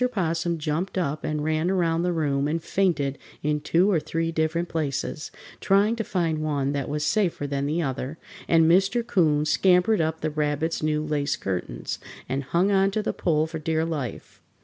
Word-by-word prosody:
'Possum 170 -3 -1
jumped 160 +5 -2
up 155 -4 -1
and 150 -1 -2
ran 155 +2 0
around 170 -3 +1
the 180 +1 +1
room 145 -4 0
and 160 +2 -2
fainted 160 -8 0 0.2
in 150 0 0
two 175 +6 +3
or 170 - +3
three 165 +2 -2
different 165 +2 0
places, 150 -1 -3 0.3
trying 205 +3 +3
to 225 - -2
find 170 -6 -1
one 145 -3 0
that 140 -2 -2
was 150 0 -1
safer 175 -3 +1
than 140 0 -2
the 165 +3 0
other, 135 +2 -3 0.3
and 165 -1 +5
Mr. 195 +8 +3
'Coon 155 -9 +2
scampered 185 +5 +3
up 160 0 -1
the 155 - -1
Rabbit's 150 +2 -1
new 155 0 0
lace 145 -2 0
curtains 90 -10 -4 0.3
and 135 +1 -2
hung 180 +7 +2
on 195 0 +4
to 210 +2 -2
the - - -1
pole 155 -2 +1
for 160 0 -6
dear 160 +1 0
life. 145 -8 -5
160 Hz, 185 wpm, -25 LUFS, 150-175 Hz, 0.3 s, and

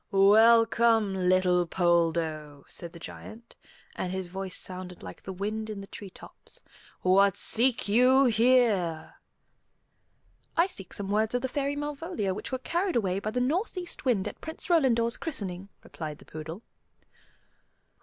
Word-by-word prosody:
"Welcome, 225 +1 +5
little 180 -1 +2
Poldo," 165 -4 0
said 170 -1 -7
the 170 - -12
Giant; 220 +7 -11 0.4
and 180 - -3
his 190 0 -3
voice 190 +1 -5
sounded 180 -1 -7
like 90 -1 -9
the 190 - -7
wind 215 +3 -4
in 210 -2 -5
the 195 - -8
treetops; 200 - -12 0.4
"what 195 +1 +4
seek 240 -1 +1
you 255 +5 +5
here?" 225 -9 +2 1.4
"I 340 - +5
seek 195 - -9
some 200 -1 -5
words 220 +3 +1
of 245 - -1
the - - +1
Fairy 280 +1 -2
Malvolia 290 - -3
which - - -7
were 260 - -1
carried 345 +8 -1
away 195 -5 +1
by 210 - -3
the 250 - -2
northeast 355 - -2
wind 230 -8 +1
at - - -8
Prince 320 +2 -6
Rolandor's 235 -8 +3
christening," 195 - -5
replied 155 -2 -7
the - - -17
poodle. 160 +7 -8
205 Hz, 145 wpm, -28 LUFS, 185-250 Hz, 1.4 s, Welcome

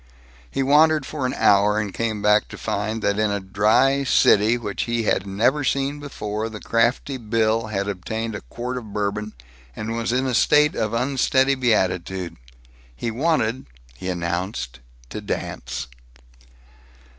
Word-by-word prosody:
He 135 - -1
wandered 150 +1 +4
for 140 -3 -3
an 125 - -3
hour 105 +1 +4
and 105 -3 -2
came 110 -3 -2
back 105 0 +4
to - - -10
find 110 +2 -3
that, 100 +1 +1
in 110 -1 +2
a 100 0 -1
"dry" 105 +8 +2
city 110 -2 +4
which 105 -4 -3
he 120 -1 -1
had 100 -2 0
never 120 +9 +1
seen 140 +2 0
before, 110 -6 -4
the 110 -1 -8
crafty 120 +5 0
Bill 110 -1 0
had 100 -2 -2
obtained 110 +4 -4
a 105 - -5
quart 120 - -5
of 110 -4 -12
Bourbon, 105 +1 -2 0.4
and 110 +1 -4
was 115 0 -1
in 130 +2 +1
a 130 - -1
state 150 +5 +4
of 110 -1 -2
unsteady 130 +2 +2
beatitude. 95 -8 0 0.6
He 115 - -3
wanted, 130 - 0 0.3
he 95 +7 -5
announced, 85 - -3 0.3
to - - -5
dance. - - -4
110 Hz, 155 wpm, -22 LUFS, 100-130 Hz, 0.6 s, wandered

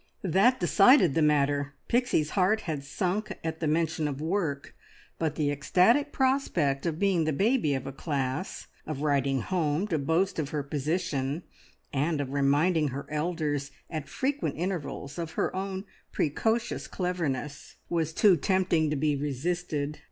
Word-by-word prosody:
That 195 +8 +3
decided 190 - +5
the 165 - +2
matter! 145 -1 +2
Pixie's 240 -11 +1
heart 205 +3 +2
had 155 -5 -4
sunk 185 +8 -2
at 160 0 -3
the 160 - -1
mention 160 0 +1
of 140 -2 -4
work; 160 -4 -2 0.5
but 155 -2 -1
the 145 -2 +1
ecstatic 185 - +3
prospect 180 - +1
of 160 -2 -1
being 185 -4 +2
the 155 - +1
baby 195 - +2
of 135 0 -4
a 135 - -4
class, 135 +3 -3 0.2
of 150 -2 -4
writing 140 -3 +1
home 165 - 0
to 160 - 0
boast 165 +6 +1
of 145 -3 -2
her 150 -2 -2
position, 150 0 -2 0.5
and 150 +3 0
of 140 -1 -3
reminding 150 +4 +3
her 140 +1 -5
elders 150 -3 -1 0.2
at 155 -4 -4
frequent 280 - -1
intervals 170 -4 -4
of 165 -1 -4
her - - -1
own 190 +1 -3 0.3
precocious 225 +10 0
cleverness, 155 -6 -3
was 165 -2 -1
too 190 +3 +5
tempting 180 -2 +2
to 150 - 0
be 150 +1 +1
resisted. 150 +1 -2
155 Hz, 150 wpm, -28 LUFS, 145-185 Hz, 0.5 s, decided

